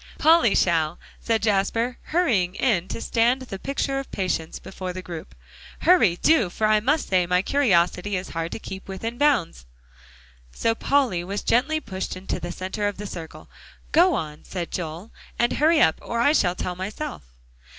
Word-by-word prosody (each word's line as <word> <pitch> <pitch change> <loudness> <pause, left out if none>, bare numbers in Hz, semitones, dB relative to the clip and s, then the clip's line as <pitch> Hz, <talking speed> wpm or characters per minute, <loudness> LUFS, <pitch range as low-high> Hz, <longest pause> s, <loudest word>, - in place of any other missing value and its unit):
"Polly 320 -8 +5
shall," 165 -2 +2 0.2
said 225 -2 0
Jasper, 225 +4 0
hurrying 225 - +1
in 210 -9 +1
to - - -5
stand 240 +3 +1
the 195 -6 -7
picture 275 +1 -2
of 275 - -7
patience 180 -4 -2
before 185 -1 -7
the 185 0 -7
group. 170 -3 -8 0.5
"Hurry, 335 - +5
do, 310 - +4
for 215 - -1
I 215 0 +4
must 285 +8 0
say 180 -2 +2
my 180 +1 +2
curiosity 200 -6 +2
is 185 - -6
hard 165 0 -4
to - - -3
keep 190 -3 -8
within 225 +5 -5
bounds." 225 - +1 0.8
So 225 - 0
Polly 240 -8 +1
was 200 +3 -4
gently 285 +7 +2
pushed 190 -11 -5
into 185 - -4
the 175 - -5
center 190 +3 -3
of 205 - -4
the 210 - -6
circle. 165 -5 -8 0.4
"Go 350 0 +5
on," 150 -6 -5
said 175 -3 -5
Joel, 170 +4 -5 0.3
"and 240 0 +2
hurry 315 +2 +3
up, 160 - +3
or 235 - -3
I 285 +5 +4
shall 180 - +2
tell 180 0 -4
myself." 200 - -5
205 Hz, 175 wpm, -24 LUFS, 180-255 Hz, 0.8 s, Polly